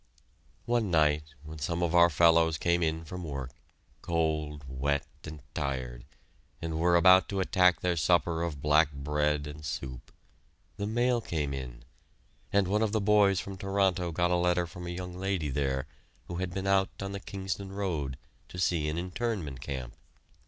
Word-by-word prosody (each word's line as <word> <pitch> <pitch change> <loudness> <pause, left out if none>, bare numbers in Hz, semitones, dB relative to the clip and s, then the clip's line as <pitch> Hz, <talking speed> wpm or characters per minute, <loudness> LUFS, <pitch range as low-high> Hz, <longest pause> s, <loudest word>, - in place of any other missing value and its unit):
One 120 -4 +1
night, 75 -2 +2
when 75 0 -9
some 85 +4 -1
of 85 -1 0
our 85 0 +7
fellows 80 0 +4
came 85 +2 +1
in 80 0 -1
from 90 +3 -7
work, 70 -5 -5 0.5
cold, 75 -3 -1
wet, 70 +2 -1 0.2
and 75 -3 -9
tired, 65 -4 -3 0.5
and 80 -1 -3
were 85 +1 +4
about 95 +1 +6
to 100 - -2
attack 90 -3 +3
their 90 -1 +1
supper 85 +1 +2
of 80 -5 -4
black 75 0 +4
bread 75 +1 0
and 75 +1 -8
soup, 65 -4 -6 0.7
the 100 - -2
mail 120 +2 +1
came 75 -8 -2
in, - - -7 0.7
and 100 -2 +3
one 105 +3 +1
of 110 -1 +1
the 110 - +2
boys 100 -2 +4
from 95 -1 -6
Toronto 95 -2 0
got 90 +2 +1
a - - +4
letter 90 0 +2
from 90 +1 -8
a - - -4
young 90 0 -5
lady 95 -4 -2
there 65 -1 -1 0.4
who 85 - -5
had 90 -1 -2
been 95 +2 -4
out 95 0 +3
on 95 0 -4
the 100 - -4
Kingston 95 0 -5
Road 80 -10 -3 0.3
to - - -9
see 85 -4 +1
an 80 - -3
Internment 90 - -3
Camp. 65 -3 -5
85 Hz, 175 wpm, -29 LUFS, 75-95 Hz, 0.7 s, our